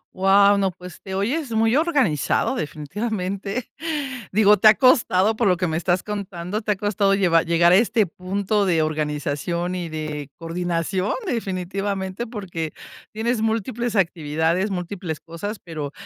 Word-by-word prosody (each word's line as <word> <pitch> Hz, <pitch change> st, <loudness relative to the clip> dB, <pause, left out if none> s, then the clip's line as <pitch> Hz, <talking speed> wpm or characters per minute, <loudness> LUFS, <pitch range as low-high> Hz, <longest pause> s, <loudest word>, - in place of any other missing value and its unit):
Guau, 200 Hz, +1 st, +5 dB
no, 195 Hz, -2 st, +1 dB
pues 180 Hz, 0 st, -12 dB
te 190 Hz, -, -7 dB
oyes 250 Hz, +7 st, -1 dB
muy 225 Hz, +2 st, +2 dB
organizado, 270 Hz, -, +1 dB
definitivamente. 195 Hz, -, -4 dB, 0.6 s
Digo, 210 Hz, +1 st, +5 dB
te 215 Hz, -, +5 dB
ha -, -, +8 dB
costado, 220 Hz, -5 st, +4 dB
por 230 Hz, -1 st, +1 dB
lo 180 Hz, -2 st, +3 dB
que 180 Hz, -, 0 dB
me 160 Hz, 0 st, -1 dB
estás 175 Hz, +1 st, +1 dB
contando, 200 Hz, -1 st, -4 dB
te 210 Hz, -1 st, -1 dB
ha -, -, +2 dB
costado 200 Hz, 0 st, +1 dB
llevar 175 Hz, -4 st, +3 dB
llegar 170 Hz, +1 st, +4 dB
a -, -, +7 dB
este 220 Hz, +1 st, +3 dB
punto 200 Hz, +3 st, -1 dB
de 165 Hz, -4 st, +2 dB
organización 155 Hz, +3 st, -2 dB
y 175 Hz, -2 st, -4 dB
de 155 Hz, -2 st, -5 dB
coordinación, 175 Hz, +3 st, -2 dB
definitivamente, 195 Hz, -, -3 dB
porque 185 Hz, -9 st, -5 dB, 0.4 s
tienes 225 Hz, +1 st, -1 dB
múltiples 225 Hz, +1 st, -1 dB
actividades, 165 Hz, +2 st, 0 dB
múltiples 180 Hz, -3 st, -4 dB
cosas, 170 Hz, +6 st, -6 dB
pero 155 Hz, -4 st, -5 dB
190 Hz, 145 wpm, -22 LUFS, 170-210 Hz, 0.6 s, ha